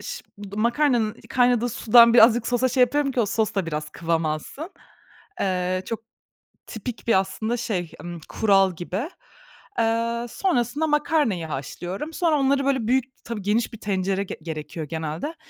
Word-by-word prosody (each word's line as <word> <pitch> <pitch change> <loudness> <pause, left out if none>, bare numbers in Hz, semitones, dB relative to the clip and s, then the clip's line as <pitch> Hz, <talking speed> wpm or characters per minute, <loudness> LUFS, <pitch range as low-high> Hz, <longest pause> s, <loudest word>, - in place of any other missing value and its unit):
ş - - -6 0.3
makarnanın 235 -1 +2
kaynadığı 245 -1 +3
sudan, 235 0 +6
birazcık 230 0 +6
sosa 245 +1 +2
şey 255 +1 0
yapıyorum 275 +2 +3
ki, 250 - +1
o 220 - +2
sos 220 +1 0
da 190 -4 -1
biraz 150 -1 -4
kıvam 165 -1 -1
alsın. 155 - -4 0.7
Eee, 185 -1 0
çok 230 - -4 0.7
tipik 230 +2 -7
bir 225 -5 +5
aslında 220 +5 -2
şey, 185 -8 -3
ımm, 175 -1 -7
kural 195 -4 +3
gibi. 190 - -4 0.7
Eee, 230 +1 0
sonrasında 285 - 0
makarnayı 295 - +1
haşlıyorum. 175 - -5
Sonra 320 -3 +2
onları 275 0 +2
böyle 265 -5 +1
büyük 255 +1 +2 0.2
tabii 230 -3 -5
geniş 220 +4 0
bir 225 - -9
tencere 195 -1 -1
ge - - -7
gerekiyor 155 0 -6
genelde. 160 - -4
225 Hz, 150 wpm, -24 LUFS, 185-250 Hz, 0.7 s, sudan